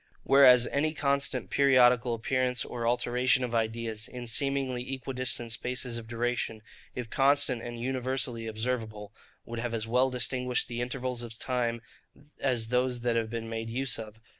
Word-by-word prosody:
Whereas 130 -3 +7
any 155 +5 -1
constant 140 -3 0
periodical 125 -3 +4
appearance, 125 +2 0
or 120 -1 -4
alteration 125 +2 +2
of 120 -1 -3
ideas, 110 -1 -1
in 125 -1 -8
seemingly 130 +1 0
equidistant 130 -2 -1
spaces 125 0 -2
of 115 - -11
duration, 115 -1 -2 0.3
if 120 -3 -6
constant 135 -3 +3
and 120 0 -7
universally 130 -2 -2
observable, 110 -2 -4 0.3
would 115 0 -6
have 115 0 -2
as 110 0 -3
well 125 +3 +3
distinguished 125 0 0
the 120 0 -4
intervals 125 0 -3
of 115 -2 -6
time, 120 -2 -2 0.6
as 120 -4 0
those 125 0 0
that 120 -1 0
have 115 -1 0
been 115 0 -5
made 115 0 -4
use 130 +1 -1
of. 110 0 -9
125 Hz, 155 wpm, -29 LUFS, 115-130 Hz, 0.6 s, Whereas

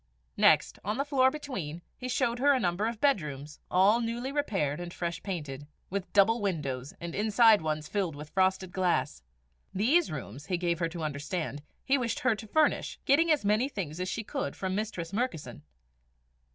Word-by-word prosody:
Next, - - +4
on 210 +3 -2
the 275 - 0
floor 265 -3 +4
between, 195 - -6
he 255 - -6
showed 245 -1 0
her 285 +2 +5
a 265 - +2
number 185 +2 0
of 230 -1 -4
bedrooms, 150 - -1
all 200 +6 +4
newly 240 +3 -3
repaired 190 - -1
and 175 0 -6
fresh 170 -1 -4
painted, 145 -7 -5 0.2
with 195 -1 -3
double 215 +3 +4
windows, 140 -9 -3
the 170 -1 -6
inside 220 0 +5
ones 155 -1 -2
filled 190 -7 -1
with 150 +1 -9
frosted 190 -1 +1
glass. 175 - 0 0.5
These 280 - +3
rooms, 135 -1 -7
he 185 -2 0
gave 170 -1 -1
her 165 -1 0
to 165 -1 -6
understand, 150 +1 -3 0.2
he 275 +1 +3
wished 235 -3 -2
her 255 -2 +3
to 215 +1 -8
furnish, 310 +7 +1
getting 325 +5 +4
as 300 -9 +2
many 215 +6 +2
things 175 - -5
as 185 0 -2
she 225 - -3
could 275 +6 -4
from 190 -1 -3
Mistress 195 -4 -3
Murkison. 200 - -3
195 Hz, 180 wpm, -29 LUFS, 160-235 Hz, 0.5 s, her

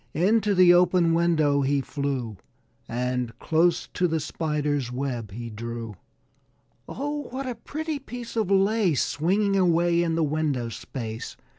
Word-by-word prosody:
Into 205 +4 +2
the 180 -1 +7
open 175 -1 +4
window 155 -4 +2
he 140 +1 +1
flew 135 -6 -3 0.5
And 125 0 -2
close 165 +2 +1
to 180 - +1
the 160 -1 0
Spider's 150 -4 -2
web 125 -4 -3
he 115 +4 -7
drew. 115 0 -6 0.9
"Oh, 290 +1 -4
what 265 +2 -5
a 255 - -2
pretty 310 +4 -5
piece 245 -3 -8
of 220 -4 0
lace 195 -4 +3
Swinging 195 +6 +1
away 170 -2 +3
in 165 -1 0
the 165 - +1
window 145 -5 -1
space!" 115 -1 -6
160 Hz, 140 wpm, -25 LUFS, 130-195 Hz, 0.9 s, the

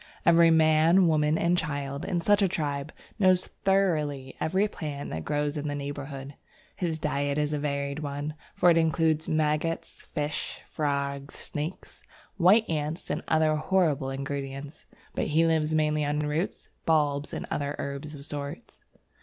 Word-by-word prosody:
Every 170 0 +7
man, 160 +3 +5
woman, 155 -1 +3
and 170 +1 +2
child 140 -4 -3
in 175 -2 -1
such 205 +4 +4
a 195 - +5
tribe 145 -4 -2 0.3
knows 185 -2 +4 0.2
thoroughly 155 -9 +1
every 190 +6 +2
plant 150 -7 -6
that 80 0 -4
grows 145 0 -1
in 150 0 -3
the 145 - -2
neighbourhood. 140 -1 -6 0.4
His 170 -3 -1
diet 145 -2 -1
is 150 0 0
a 150 - 0
varied 140 0 -2
one, 145 0 -4 0.2
for 175 - +5
it 165 - +4
includes 160 -1 +2
maggots, 155 +1 0 0.2
fish, 150 0 -3
frogs, 140 -1 -2
snakes, 150 +5 -5 0.4
white 200 +5 +5
ants, 155 +1 -3
and - - -1
other 155 -1 +3
horrible 155 -4 +1
ingredients, 140 +1 -5 0.3
but - - -1
he 160 +2 +3
lives 160 -1 +2
mainly 150 -1 +2
on 145 +1 0
roots, 150 +4 -2 0.2
bulbs, 145 -2 +2
and - - -4
herbs 145 +1 -3
of 140 -1 -8
sorts. 145 +8 -6
150 Hz, 150 wpm, -28 LUFS, 145-165 Hz, 0.4 s, Every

